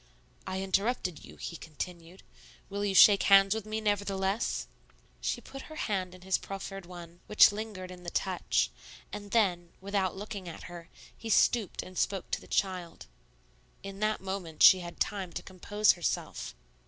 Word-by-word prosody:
"I 190 0 -2
interrupted 195 -2 -1
you," - - -12
he 170 - -6
continued; 170 +3 -8 0.5
"will 200 +1 -2
you 200 -2 0
shake 200 +1 +8
hands 195 0 +6
with 220 -1 -5
me, 215 +1 -2
nevertheless?" 205 0 0 0.6
She - - -2
put 270 +2 -10
her 310 - -9
hand 185 -9 -2
in 185 - -15
his 190 0 +1
proffered 195 -1 -7
one, 175 -1 -11
which 210 - +7
lingered 205 -3 -6
in 180 -1 -11
the 175 - -5
touch; 185 +1 0 0.4
and 205 0 -7
then, 180 -6 +1
without 195 -1 -1
looking 200 -3 -6
at 165 - -9
her, 175 -1 -10 0.3
he 230 - -8
stooped 220 -2 +2
and 185 -1 -7
spoke 195 -2 -1
to - - -1
the - - -14
child. 185 -3 -2 0.8
In 195 0 -8
that 215 0 0
moment 190 -4 -3
she 185 - +9
had 175 -1 -8
time 195 -4 -1
to - - -5
compose 205 +3 +2
herself. 175 - -3
195 Hz, 165 wpm, -30 LUFS, 180-205 Hz, 0.8 s, she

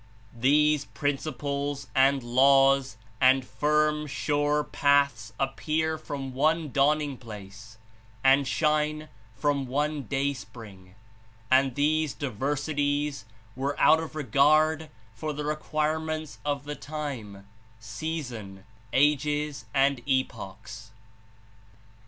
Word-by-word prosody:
"These 145 +4 +3
principles 145 0 -3
and 135 0 +3
laws 135 0 +4 0.2
and 130 0 +5
firm, 150 +1 +1
sure 145 +1 0
paths 140 -7 +1
appear 155 +4 -1
from 140 -4 -6
one 155 +2 +1
dawning 145 0 +1
place 110 0 -11 0.5
and 135 +1 +5
shine 155 +2 0 0.3
from 140 0 0
one 145 +2 -1
day 140 0 0
spring, 105 -7 -12 0.6
and 130 -1 +4
these 155 0 +1
diversities 145 +1 -2 0.3
were 140 +2 -3
out 160 - +6
of 160 -1 -6
regard 155 +3 +3 0.2
for 150 +7 -4
the 145 0 -5
re 150 +1 0
quirements 155 0 -2
of 145 -1 -2
the 145 +1 -5
time, 125 -12 -6 0.3
season, 115 -5 -6 0.3
ages 150 -2 +1
and 135 0 +2
epochs." 110 -4 -3
140 Hz, 100 wpm, -27 LUFS, 130-150 Hz, 0.6 s, out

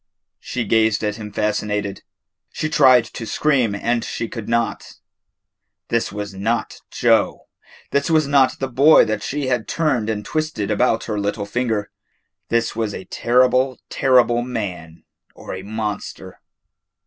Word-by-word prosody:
She 120 -2 -4
gazed 110 0 +2
at 105 0 -1
him 105 -2 -8
fascinated. 105 -1 -2 0.5
She 155 - -3
tried 130 -6 +5
to 115 0 -8
scream 130 -9 +1
and 120 +3 -1
she 115 - -4
could 115 -1 -7
not. 115 0 -1 1.0
This 115 0 0
was 105 -1 -5
not 110 +5 -2
Joe. - - +1 0.5
This 140 +2 +1
was 155 -2 +3
not 140 -2 +3
the 135 - -2
boy 135 +5 +6
that 110 - -2
she 145 0 -3
had 125 -3 -1
turned 130 -9 0
and 105 -2 -3
twisted 155 -10 -2
about 115 +2 +2
her 105 -2 -3
little 100 0 -2
finger. 110 -1 -2 0.6
This 115 0 0
was 110 -3 -2
a 95 - -8
terrible, 125 +5 +2
terrible 125 -2 +3
man 90 -10 -5 0.3
or - - -8
a 95 - -6
monster. 105 0 -5
115 Hz, 145 wpm, -20 LUFS, 105-130 Hz, 1.0 s, boy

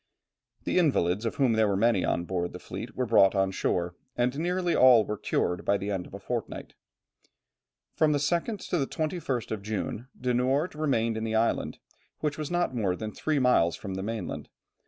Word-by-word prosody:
The - - +1
invalids, 110 - +2
of - - -3
whom 130 -5 +3
there 110 -1 +3
were 100 -1 +1
many 110 -2 +3
on 85 - 0
board 90 -1 -3
the - - -6
fleet, - - -7
were 130 - 0
brought 100 -4 +5
on 95 -1 +2
shore, 90 -2 -1 0.2
and 125 +2 +1
nearly 180 +1 0
all 125 -4 +7
were 105 - -3
cured 90 -3 -1
by 100 - +2
the 100 +1 -4
end 95 -3 -3
of - - -11
a - - -7
fortnight. - - -5 1.2
From 155 -1 +3
the 145 - +2
2nd 170 +8 -1
to 175 - +2
the 135 - 0
21st 155 - -3
of 110 -2 -3
June, 110 +3 -4
De 125 0 0
Noort 135 +7 +1
remained 115 -7 0
in 110 - -3
this 110 0 -1
island, 115 +1 0 0.4
which 150 0 -2
was 150 - -3
not 175 -5 0
more 100 -6 0
than 110 +2 -5
three 155 +7 -1
miles 125 - +3
from 95 +2 -6
the 95 - -3
mainland. 110 +2 -4
115 Hz, 200 wpm, -28 LUFS, 100-145 Hz, 1.2 s, all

